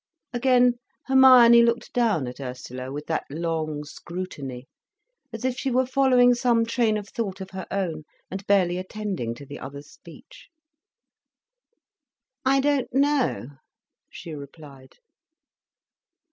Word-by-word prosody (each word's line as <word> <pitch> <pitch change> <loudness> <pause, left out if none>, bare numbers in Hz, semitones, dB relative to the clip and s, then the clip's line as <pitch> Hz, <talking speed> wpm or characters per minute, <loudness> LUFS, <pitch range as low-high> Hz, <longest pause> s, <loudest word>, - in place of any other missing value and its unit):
Again 245 -1 +3 0.3
Hermione 255 -3 +7
looked 235 0 0
down 225 - +1
at 125 +2 -8
Ursula 125 0 -7
with 145 +2 -6
that 160 - -2
long 155 -1 -3
scrutiny, 145 -5 -7 0.6
as 225 +2 -6
if 260 -1 0
she 270 - -1
were 255 +1 +2
following 255 -2 +4
some 240 -2 +2
train 230 -2 +1
of 210 -1 -7
thought 200 -4 -4
of 190 0 -8
her 190 0 -7
own, 165 -6 -3 0.3
and 190 +1 -5
barely 185 -3 +2
attending 185 - -4
to 140 - -11
the 140 +1 -9
other's 140 +2 -9
speech. - - -16 1.9
"I 270 +1 +3
don't 285 -2 0
know," 275 - +1 0.6
she 165 - -9
replied. 140 -2 -12
195 Hz, 125 wpm, -24 LUFS, 150-245 Hz, 1.9 s, Hermione